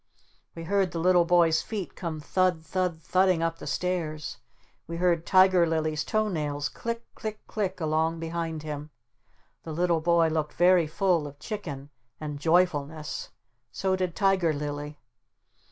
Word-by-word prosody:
We 165 - -6
heard 190 0 +1
the 165 - -2
little 175 0 +4
boy's 170 -2 +4
feet 210 -5 -5
come 165 -3 -4
thud 180 +1 +1
thud 180 -3 -2
thudding 185 -2 +3
up 165 0 -1
the - - -8
stairs. 155 -1 -2 0.5
We 165 +1 -5
heard 170 -2 +1
Tiger 185 -2 +5
Lily's 155 -2 0
toe 215 0 0
nails 150 -6 -2
click 230 0 -4
click 215 -1 -6
click 195 -3 -3
along 160 +1 0
behind 165 -1 -3
him. 150 -1 -5 0.7
The 160 - -7
little 170 0 +1
boy 170 0 +3
looked 155 -1 -1
very 175 -1 +4
full 170 -1 +1
of 140 0 -11
chicken 150 -5 -6 0.3
and 150 -2 -5
joyfulness. 160 - 0 0.4
So 190 -1 0
did 185 -3 -2
Tiger 190 -5 +2
Lily. 145 0 -5
165 Hz, 150 wpm, -27 LUFS, 155-185 Hz, 0.7 s, Tiger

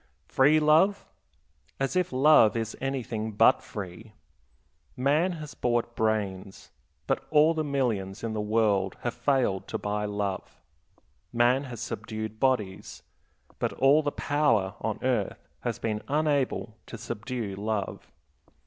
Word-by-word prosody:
Free 145 +4 +4
love? 160 +7 +3 0.7
As 135 +5 -1
if 180 -1 +1
love 130 -4 +5
is 115 -1 -3
anything 120 -5 -3
but 105 - +5
free! 105 +3 -8 0.8
Man 150 +8 +2
has 155 -3 -8
bought 120 -1 -1
brains, 100 -4 -2 0.3
but - - -1
all 155 +1 +5
the 160 -1 -1
millions 115 -9 -2
in 115 -1 -2
the 105 - -2
world 105 -3 +1
have 120 - -2
failed 120 -6 0
to - - -3
buy 105 0 -2
love. 100 -2 -4 0.7
Man 125 +4 +3
has 120 -4 -8
subdued 110 0 -5
bodies, 110 -8 -1 0.6
but - - -1
all 140 +3 +4
the 145 -1 -1
power 120 -13 +1
on - - -2
earth - - -1
has - - -3
been 105 -2 -2
unable 140 -6 0
to 115 - -8
subdue 115 -1 -5
love. 105 0 -4
115 Hz, 130 wpm, -27 LUFS, 105-140 Hz, 0.8 s, love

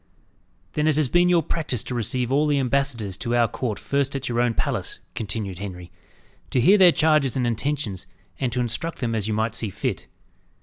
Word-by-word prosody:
"Then 150 0 +1
it 155 - +3
has 150 -5 +1
been 175 +3 +4
your 170 -2 +4
practice 145 -8 -2
to - - -4
receive 125 +1 -1
all 145 +3 +3
the 145 -1 +2
ambassadors 130 -7 0
to 120 +1 -1
our 120 -1 +4
court 110 -1 -3
first 140 +5 -1
at 135 0 -3
your 120 0 +1
own 120 -2 +1
palace," - - -1 0.2
continued 100 -4 -4
Henry, 90 -3 -7 0.6
"to 130 - +1
hear 195 - +5
their 180 -2 +8
charges 150 -6 +2
and 125 - +1
intentions, 120 -4 -2 0.3
and 130 -3 0
to 125 +1 0
instruct 160 +8 -3
them 115 -3 -2
as 110 -2 -1
you 110 - -1
might 110 +1 0
see 110 -1 -2
fit. - - -3
125 Hz, 205 wpm, -24 LUFS, 110-145 Hz, 0.6 s, their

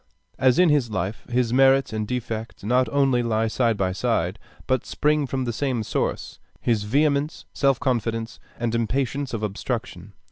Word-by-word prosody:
As 130 -2 +4
in 180 -2 +5
his 145 -6 +2
life, 95 +1 -4
his 120 -1 +1
merits 135 -1 +4
and 110 -1 -2
defects 115 -3 -4
not 125 +4 +2
only 135 -3 +2
lie 115 -1 +1
side 115 -1 +1
by 95 -2 0
side, 100 -3 -1 0.3
but 130 -2 +1
spring 150 -1 +1
from 130 0 -2
the 120 - -2
same 125 -2 -1
source, - - -3 0.2
his 110 -4 0
vehemence, 145 +5 +1
self 135 -3 +2
confidence, 115 -3 -2 0.2
and 115 -1 -1
impatience 130 +4 -1
of 110 -2 -4
obstruction. 105 -2 -4
120 Hz, 165 wpm, -24 LUFS, 110-135 Hz, 0.3 s, in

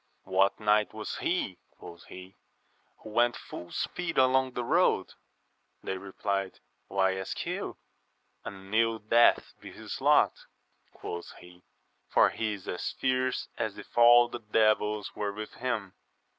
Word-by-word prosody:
What 95 +1 +2
knight 105 0 +2
was 110 -1 -5
he, 135 - -2 0.2
quoth 85 -1 -12
he, 95 +1 -12 0.7
who 110 - -9
went 120 +2 +3
full 85 - -10
speed 175 -2 -3
along 130 0 +3
the 125 - -3
road? - - +2 0.7
They - - -3
repUed, 95 0 -3 0.3
why 95 -1 +1
ask 95 - -4
you? - - -4 0.7
An 95 0 -9
ill 115 0 +3
death 115 +2 +3
be - - -11
his - - -8
lot, - - +5 0.6
quoth 85 0 -7
he, 90 0 -16 0.5
for - - +4
he 110 -1 -2
is 100 -2 -10
as 90 - -3
fierce 130 0 0
as - - -2
if - - -12
all 120 0 +7
the 120 - -7
devils 105 -1 +1
were 105 -1 -2
with 105 +1 -7
him. 115 -7 -3
105 Hz, 145 wpm, -29 LUFS, 95-120 Hz, 0.7 s, all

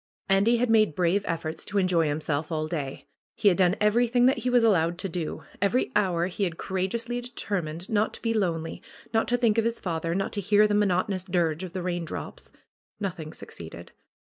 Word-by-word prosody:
Andy 200 +5 +4
had 240 0 +1
made 215 -8 +4
brave 180 +3 +2
efforts 165 -1 -3
to 205 - -3
enjoy 180 -4 +3
himself 150 +1 -2
all 155 -1 -1
day. 145 -5 -4 0.3
He 215 -3 +4
had 180 - +1
done 185 0 +4
everything 240 +3 +3
that 260 - +3
he 250 - -1
was 245 -1 +4
allowed 175 -6 +3
to 195 +1 -3
do. 160 -2 -4 0.2
Every 200 +6 +1
hour 180 -5 +2
he 190 +3 -3
had 170 -4 -1
courageously 230 +6 -2
determined 185 -8 -3
not 215 0 +1
to - - -11
be 230 -1 +1
lonely, 165 -6 -1 0.3
not 225 - +2
to 245 - +2
think 230 -2 +3
of - - +2
his 230 0 -1
father, 165 -1 -2
not 195 0 -1
to 205 - -1
hear 205 +2 +4
the 210 - 0
monoto 205 -1 +2
nous 185 -2 -3
dirge 175 -2 0
of 185 -2 -7
the 185 -2 -3
raindrops. 175 -2 -5 0.5
Nothing 175 -6 -4
succeeded. 85 - -10
190 Hz, 200 wpm, -27 LUFS, 165-215 Hz, 0.5 s, Andy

